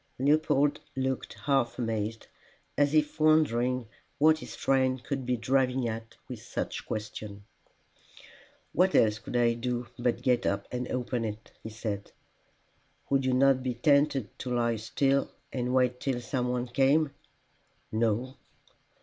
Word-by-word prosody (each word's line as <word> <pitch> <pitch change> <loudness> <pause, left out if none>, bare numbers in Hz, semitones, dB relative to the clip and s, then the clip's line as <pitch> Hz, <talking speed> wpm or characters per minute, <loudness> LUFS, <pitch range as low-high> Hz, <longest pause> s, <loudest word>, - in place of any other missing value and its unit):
Leopold 145 +1 +2 0.2
looked 130 -1 -2
half 135 -4 +1
amazed, 115 -2 -2 0.5
as 145 +1 +2
if 150 +1 +1
wondering 130 -6 +3 0.3
what 155 +1 +5
his - - -8
friend 130 -1 +1
could 135 -3 -3
be 125 -1 +1
driving 130 +1 +1
at 115 0 -6
with - - -7
such - - -4
a - - -11
question. 105 -2 -6 1.3
"What 185 +2 +3
else 110 -1 +4
could 125 - -4
I 120 -1 +4
do 120 +1 -2
but 120 0 0
get 125 -2 +2
up 100 0 -1
and 125 0 -3
open 125 -1 -2
it?" 110 0 -6
he 110 - -7
said. 105 -2 -5 1.0
"Would 135 -1 +2
you 130 - +2
not 135 0 +4
be 125 -1 -2
tempted 140 -1 +2
to 130 - -5
lie 120 -2 +1
still 135 +5 +1 0.2
and 125 -1 -1
wait 125 -1 +2
till 130 -3 -1
some 125 0 -2
one 125 0 -1
came." 140 +4 +3 0.8
"No." 115 +4 0
125 Hz, 145 wpm, -29 LUFS, 115-135 Hz, 1.3 s, what